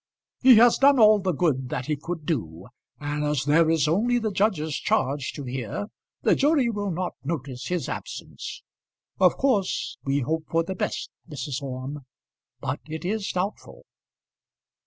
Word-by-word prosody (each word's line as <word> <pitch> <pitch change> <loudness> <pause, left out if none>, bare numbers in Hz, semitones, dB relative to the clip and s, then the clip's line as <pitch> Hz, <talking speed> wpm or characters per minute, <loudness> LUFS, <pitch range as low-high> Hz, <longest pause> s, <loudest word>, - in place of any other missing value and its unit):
"He 255 -1 +8
has 235 +2 +6
done 280 0 +6
all 215 -2 +7
the 190 -1 0
good 140 -6 0
that 130 - -3
he 150 - 0
could 160 +2 -6
do, 90 - -3 0.3
and 150 0 -2
as 150 -3 0
there 160 +2 +4
is 160 -2 +2
only 225 +10 +2
the 220 -3 -1
judge's 185 -7 0
charge 135 +1 0
to 145 - -6
hear, 130 - -4 0.3
the - - +5
jury 280 -4 +3
will 205 -2 -2
not 180 0 -2
notice 135 -4 -4
his 180 -6 -2
absence. - - -7 0.6
Of 180 -2 +4
course 220 -9 0
we 140 0 0
hope 160 +5 -2
for 165 0 +2
the 190 - -4
best, 185 - -3 0.2
Mrs. 145 -1 -4
Orme, 135 +2 -5 0.6
but - - -3
it 160 +2 -6
is 205 +1 -1
doubtful." 185 +3 -4
160 Hz, 160 wpm, -25 LUFS, 140-205 Hz, 0.6 s, He